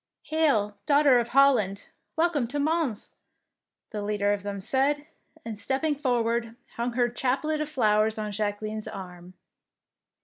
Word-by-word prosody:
" - - -63
Hail, 215 -11 +2
Daughter 285 -3 +5
of 235 - -1
Holland, 240 -7 +3 0.3
welcome 320 -6 +1
to 290 - -4
Mons,^' 305 -6 0 0.8
the 210 - -4
leader 205 0 +1
of 205 - -3
them 200 0 -5
said, 275 +8 0 0.4
and 220 -3 -6
stepping 275 +7 0
forward, 235 -4 0 0.2
hung 235 +1 -2
her 245 0 +2
chaplet 270 +6 -1
of 305 - -3
flowers 215 -6 +2
on 210 -1 -3
Jacqueline's 215 +1 -3
arm. 180 -1 -9
235 Hz, 140 wpm, -27 LUFS, 210-280 Hz, 0.8 s, Daughter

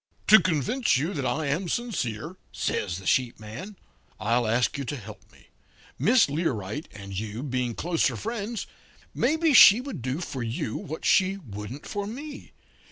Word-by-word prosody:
"'To 215 - +9
convince 185 - +1
you 160 +9 -1
that 140 -4 -2
I 150 +6 -1
am 160 +6 -1
sincere,' 160 - -3 0.2
says 85 - -2
the 95 - -10
sheep 125 +2 +1
man, 115 - -8 0.4
'I'll 115 +3 +1
ask 120 +3 +1
you 140 - -3
to 145 - -3
help 110 -2 -12
me. - - -22 0.5
Miss 230 +1 +5
Learight 140 - -2
and 100 -1 -9
you 110 +3 -5
being 125 -4 -2
closer 170 -1 0
friends, 225 0 -4 0.5
maybe 315 +4 +2
she 215 -3 +10
would 255 - -6
do 130 +5 -2
for 140 -7 -5
you 115 -1 -3
what 160 -5 -6
she 190 +1 +3
wouldn't 115 - -8
for 205 0 -4
me. 285 +7 -8
145 Hz, 165 wpm, -26 LUFS, -, 0.5 s, she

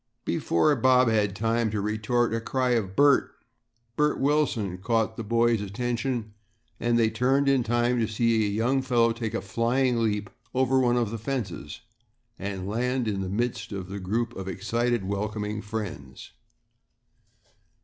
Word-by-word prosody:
Before 145 - +2
Bob 125 0 +4
had 105 -3 +1
time 115 +1 0
to 105 0 -2
retort, 110 +3 0
a 115 - -1
cry 130 +2 0
of 100 -6 0
"Bert, 145 0 +4 0.6
Bert 150 +1 +1
Wilson!" 135 -10 0
caught 110 +2 0
the 115 - -5
boys' 115 0 +2
attention, 120 +2 -3 0.5
and 120 0 +1
they 110 -1 +3
turned 130 +5 +2
in 135 -2 +4
time 120 +1 +1
to 110 - +1
see 115 0 +1
a - - -1
young 120 +6 +1
fellow 120 -3 +2
take 115 -1 -4
a - - -1
flying 120 +5 +1
leap 105 -2 -1 0.2
over 130 0 +3
one 125 -1 +3
of 115 -4 0
the 115 - -4
fences 110 - -4 0.6
and 95 -1 -4
land 125 +3 -1
in 100 -2 -1
the 95 - -3
midst 115 +2 -2
of 95 -2 -6
a 100 - -4
group 115 +5 -2
of 95 -1 -6
excited, 120 +4 -1
welcoming 105 +1 -3
friends. 100 -12 -6
115 Hz, 160 wpm, -26 LUFS, 105-125 Hz, 0.6 s, Bob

